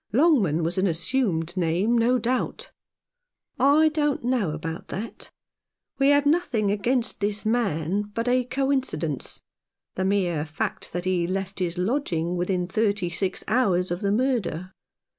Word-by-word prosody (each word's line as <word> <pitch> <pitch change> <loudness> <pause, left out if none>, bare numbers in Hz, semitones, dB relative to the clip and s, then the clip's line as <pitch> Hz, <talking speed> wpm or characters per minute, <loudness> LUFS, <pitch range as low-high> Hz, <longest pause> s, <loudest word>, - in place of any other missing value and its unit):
Longman 220 - +3
was 170 +4 -1
an 195 - +2
assumed 175 -2 0
name, 185 +6 +1
no 240 +2 +3
doubt." 245 +2 -2 0.9
"I 290 +4 +5
don't 295 -4 0
know 240 -7 +1
about 160 +2 -5
that. 215 +5 -6 0.7
We 275 +1 +4
have 285 0 +4
nothing 285 - +2
against 235 +4 0
this 205 +1 -1
man 205 -3 0
but 230 +1 -1
a 250 +1 +3
coincidence 260 - -1 0.2
— - - -65
the 185 - -1
mere 185 -5 +1
fact 155 0 -4
that 175 +1 -3
he 180 -2 +1
left 195 +1 -3
his 175 -1 -2
lodging 180 - -1
within 180 0 0
thirty 200 -2 0
six 185 +2 -2
hours 190 -6 +2
of 175 - -2
the 200 -1 +1
murder. 205 - -1
200 Hz, 145 wpm, -25 LUFS, 175-250 Hz, 0.9 s, I